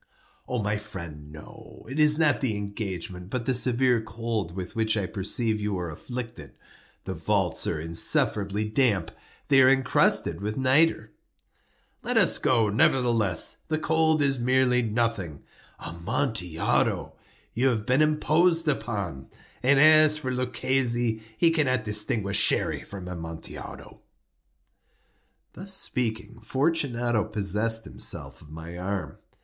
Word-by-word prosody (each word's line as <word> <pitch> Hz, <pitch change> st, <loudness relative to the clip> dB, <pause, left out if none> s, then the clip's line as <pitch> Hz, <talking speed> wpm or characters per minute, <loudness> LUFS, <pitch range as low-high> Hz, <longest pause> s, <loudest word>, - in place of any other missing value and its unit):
"My 105 Hz, -4 st, -1 dB
friend, 85 Hz, -8 st, -9 dB
no. 75 Hz, 0 st, -13 dB
It 135 Hz, +5 st, -5 dB
is 150 Hz, 0 st, +5 dB
not 150 Hz, -5 st, +2 dB
the 115 Hz, -6 st, -1 dB
engagement, 95 Hz, -3 st, -5 dB
but 120 Hz, +1 st, -3 dB
the 130 Hz, -, +2 dB
severe 125 Hz, -1 st, +2 dB
cold 110 Hz, -5 st, -4 dB
with 95 Hz, +3 st, -6 dB
which 110 Hz, -1 st, +1 dB
I 100 Hz, -, -1 dB
perceive 110 Hz, +2 st, -2 dB
you 105 Hz, -2 st, -2 dB
are 90 Hz, -2 st, -4 dB
afflicted. 120 Hz, -, -8 dB, 0.5 s
The -, -, -4 dB
vaults -, -, -1 dB
are -, -, -2 dB
insufferably 100 Hz, +5 st, 0 dB
damp. 105 Hz, -6 st, +1 dB, 0.4 s
They 135 Hz, -2 st, +6 dB
are 130 Hz, -, +7 dB
encrusted 135 Hz, -6 st, +2 dB
with 105 Hz, +1 st, -3 dB
nitre." 135 Hz, +5 st, +2 dB, 0.9 s
"Let -, -, +1 dB
us -, -, +4 dB
go, 115 Hz, -4 st, +2 dB
nevertheless. 115 Hz, -4 st, +2 dB
The 155 Hz, -, 0 dB
cold 160 Hz, -1 st, +2 dB
is 135 Hz, -2 st, +1 dB
merely 125 Hz, 0 st, +2 dB
nothing. 110 Hz, -9 st, -2 dB, 0.3 s
Amontillado! 90 Hz, -, -1 dB, 0.4 s
You 125 Hz, +4 st, +1 dB
have 110 Hz, -5 st, 0 dB
been 130 Hz, +6 st, +2 dB
imposed 160 Hz, +2 st, +2 dB
upon. 100 Hz, -, -3 dB, 0.3 s
And 135 Hz, +2 st, +4 dB
as 155 Hz, 0 st, +6 dB
for 130 Hz, -4 st, -4 dB
Luchesi, 125 Hz, -2 st, 0 dB, 0.2 s
he 165 Hz, +5 st, +4 dB
cannot 130 Hz, -7 st, +1 dB
distinguish 105 Hz, -1 st, 0 dB
Sherry -, -, +2 dB
from 95 Hz, -2 st, -9 dB
Amontillado." 80 Hz, -2 st, -8 dB, 1.5 s
Thus 190 Hz, +1 st, -4 dB
speaking, 115 Hz, -6 st, -2 dB
Fortunato 120 Hz, -4 st, 0 dB
possessed 110 Hz, +2 st, 0 dB
himself 65 Hz, -3 st, -4 dB
of 75 Hz, -, -16 dB
my 80 Hz, +3 st, -9 dB
arm. 95 Hz, +1 st, -4 dB
115 Hz, 125 wpm, -26 LUFS, 100-130 Hz, 1.5 s, are